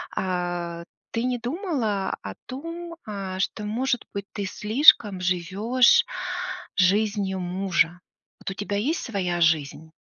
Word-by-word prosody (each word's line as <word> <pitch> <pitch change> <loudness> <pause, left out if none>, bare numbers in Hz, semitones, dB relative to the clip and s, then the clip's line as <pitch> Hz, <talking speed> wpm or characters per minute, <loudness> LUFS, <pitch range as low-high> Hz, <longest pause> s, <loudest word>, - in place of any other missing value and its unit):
А 175 -2 -2 0.3
ты 230 - -1
не 250 0 0
думала 245 - -2
о 100 - -5
том, 335 +5 -7
а, 195 -3 -5
что, 210 +2 -2
может 245 +3 0
быть, 200 0 -4
ты 200 - -3
слишком 210 -2 +5
живёшь 190 +8 +3 0.7
жизнью 200 0 +2
мужа? 180 -1 0 0.4
Вот - - -4
у - - -4
тебя 205 +1 -3
есть 285 +11 0
своя 185 -7 -2
жизнь? 160 -1 +1
200 Hz, 125 wpm, -25 LUFS, 180-240 Hz, 0.7 s, слишком